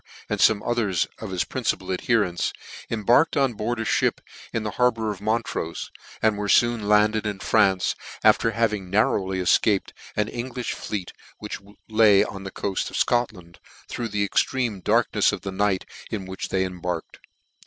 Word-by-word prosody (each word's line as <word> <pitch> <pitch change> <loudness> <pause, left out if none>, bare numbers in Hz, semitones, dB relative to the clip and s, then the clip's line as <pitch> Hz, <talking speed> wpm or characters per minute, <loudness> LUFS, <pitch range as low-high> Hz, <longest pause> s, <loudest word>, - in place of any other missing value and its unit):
and - - -1
fome 105 -2 +4
others 110 -7 +1
of 110 - -6
his 90 -2 0
principal - - -2
adherents, 95 -2 +1 0.4
cm 110 -3 -3
barked 135 +9 +4
on 135 -3 +2
board 110 +2 -2
a - - -1
fhip - - +1 0.3
in 115 - -2
the 105 - -3
harbour 115 -3 +2
of 100 - -7
Montrofe, 110 -6 -2 0.3
and 110 -2 +3
were 105 -1 -2
foon 120 -1 +3
landed 105 +1 +3
in 105 -2 -3
France, 100 -2 +2 0.3
after 115 - +5
having 105 -4 -1
nar 105 +3 +3
rowly 95 -1 -3
efcaped 95 +2 +2 0.2
an 105 - +1
Englifli 125 +1 -4
fleet 100 -4 -5 0.2
which 105 - -6 0.3
lay 110 -3 +5
on 95 -1 -7
the - - -4
coaft 95 0 -2
of - - -5
Scotland, 105 -8 -1 0.3
through 120 - -4
the 105 -1 -1
extreme 110 0 0
darknefs 110 0 +2
of 105 - -5
the 100 - -5
night 95 0 0 0.2
in 100 -3 -4
which 95 0 -6
they 95 -1 +1
embarked. 90 -2 -5
105 Hz, 170 wpm, -24 LUFS, 95-115 Hz, 0.4 s, after